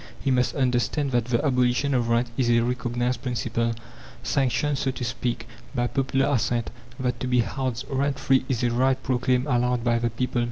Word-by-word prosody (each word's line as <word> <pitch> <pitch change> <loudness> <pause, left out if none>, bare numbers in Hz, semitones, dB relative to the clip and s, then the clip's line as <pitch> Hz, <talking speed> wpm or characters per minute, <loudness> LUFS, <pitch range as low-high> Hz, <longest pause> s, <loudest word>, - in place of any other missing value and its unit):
He 135 - 0
must 125 -1 +1
understand 130 +2 +1
that 120 -2 +1
the 120 +3 0
abolition 125 +1 +2
of 120 -2 +1
rent 120 +1 +1
is 125 -3 +1
a 115 0 +4
recognized 120 +1 -1
principle, 115 -2 -1 0.5
sanctioned, 135 +2 +1
so 135 - 0
to 130 -1 -4
speak, 120 -1 -3 0.3
by 120 -1 +1
popular 135 +1 +1
assent; 120 -3 0 0.3
that 125 -1 -1
to 130 - -3
be 125 -1 +3
housed 130 0 -3
rent 135 0 0
free 135 -1 +2
is 125 -3 0
a 120 - +2
right 130 +2 +2
proclaimed 125 0 +1
aloud 125 -3 +1
by 120 -1 +2
the 120 0 0
people. 125 +2 -2
125 Hz, 190 wpm, -25 LUFS, 120-130 Hz, 0.5 s, a